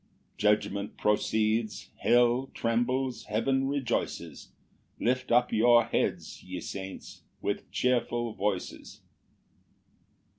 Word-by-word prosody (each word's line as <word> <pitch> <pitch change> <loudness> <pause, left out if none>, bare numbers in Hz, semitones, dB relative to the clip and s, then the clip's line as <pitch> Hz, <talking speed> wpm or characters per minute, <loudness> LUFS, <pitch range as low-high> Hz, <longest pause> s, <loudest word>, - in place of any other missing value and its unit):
Judgment 105 -1 0
proceeds; 110 +1 0
hell 120 +2 +3
trembles; 120 +2 0
heaven 135 +5 +1
rejoices: 135 -4 -3 0.5
Lift 125 +1 0
up 120 +1 +3
your 120 +1 +6
heads, - - -2
ye - - -6
saints, 95 -1 -7 0.2
with - - -3
cheerful 120 -2 0
voices. 95 -2 -3
120 Hz, 85 wpm, -29 LUFS, 105-125 Hz, 0.5 s, your